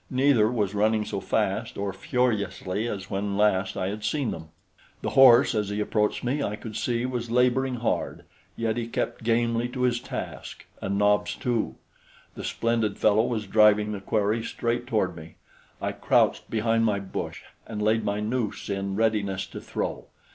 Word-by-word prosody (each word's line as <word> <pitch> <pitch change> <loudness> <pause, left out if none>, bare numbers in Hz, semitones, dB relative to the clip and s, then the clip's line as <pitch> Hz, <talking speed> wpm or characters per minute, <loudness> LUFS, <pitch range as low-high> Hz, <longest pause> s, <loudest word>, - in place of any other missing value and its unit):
Neither 130 -4 +3
was 105 -5 0
running 105 +1 +2
so 100 - -3
fast 105 +3 -1
or 100 -1 -2
furiously 105 -2 -1
as 100 -4 -5
when 100 0 -2
last 95 -2 +2
I 95 - -1
had 105 +1 -5
seen 145 -5 0
them. 80 -1 -8 0.5
The - - -1
horse, 130 0 +7
as 105 -2 -1
he 105 +1 -2
approached 105 0 0
me, 135 +4 0
I 105 -5 -1
could 110 0 -8
see 120 0 -1
was 120 -2 -3
laboring 125 +2 +2
hard; 120 -1 -2 0.3
yet 115 0 -1
he 115 -1 -2
kept 115 0 -3
gamely 115 +1 +1
to 125 0 -5
his 120 -1 +2
task, - - -7 0.2
and 100 0 -1
Nobs, 105 0 +2
too. 115 - -1 0.6
The - - -8
splendid 115 -3 0
fellow 110 +1 +4
was 110 -3 -2
driving 105 +1 +4
the 100 -2 -5
quarry 105 +2 0
straight 120 +1 -2
toward 95 -7 0
me. 80 0 -11 0.4
I - - -2
crouched - - +2
behind 115 +1 +1
my 105 -3 +2
bush 100 -1 -5 0.2
and 110 -2 -5
laid 110 +1 +2
my 100 0 -1
noose 110 -2 -2
in 100 0 -2
readiness 105 -3 0
to - - -9
throw. - - -4
110 Hz, 175 wpm, -26 LUFS, 100-120 Hz, 0.6 s, horse